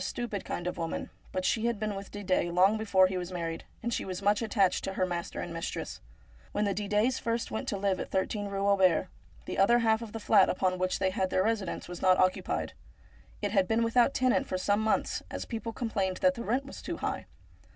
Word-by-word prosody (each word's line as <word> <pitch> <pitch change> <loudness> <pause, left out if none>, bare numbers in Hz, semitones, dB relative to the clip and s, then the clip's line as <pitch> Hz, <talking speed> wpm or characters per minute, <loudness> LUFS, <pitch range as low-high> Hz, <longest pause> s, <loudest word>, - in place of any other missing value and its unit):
stupid 215 -5 -3
kind 175 - -4
of 180 - -3
woman; 165 -1 -3 0.2
but 185 0 -2
she 225 - +1
had 235 -3 -1
been 215 -1 -1
with 195 0 -7
Didet 185 -4 0
long 185 +4 +5
before 200 -4 +4
he 185 0 -1
was 180 0 -5
married, 165 -2 -4 0.2
and 235 +1 -1
she - - -1
was 185 -1 -4
much 205 +2 +2
attached 200 -5 +2
to 195 - -3
her 185 -1 +1
master 175 -1 -4
and 170 - -5
mistress. 165 0 -5 0.5
When 210 - +1
the 200 - +1
Didets 210 +5 +1
first 230 0 -1
went 220 - -3
to 200 - -1
live 195 -1 0
at - - -4
13 205 +2 -1
Eue 195 0 -2
Auber, 185 -3 +3 0.4
the - - -4
other 235 +5 +6
half 225 -1 +2
of 225 -2 -7
the 225 - -5
flat 205 -2 +5
upon 185 0 0
which 185 0 0
they 190 -1 +1
had 190 -1 0
their 185 - +2
residence 210 -4 -1
was 175 0 -7
not 185 -1 +5
occupied. 185 0 0 0.7
It 205 - 0
had 195 -3 +3
been 225 +1 +2
without 235 +1 +4
a - - -18
tenant 255 +1 +2
for 185 - -1
some 205 +3 +1
months, 220 0 0
as - - -5
people 230 -1 -4
complained 200 -5 -1
that 275 -1 +3
the 235 - -6
rent 255 +5 0
was 275 - -9
too - - -4
high. - - -3
200 Hz, 235 wpm, -30 LUFS, 185-225 Hz, 0.7 s, other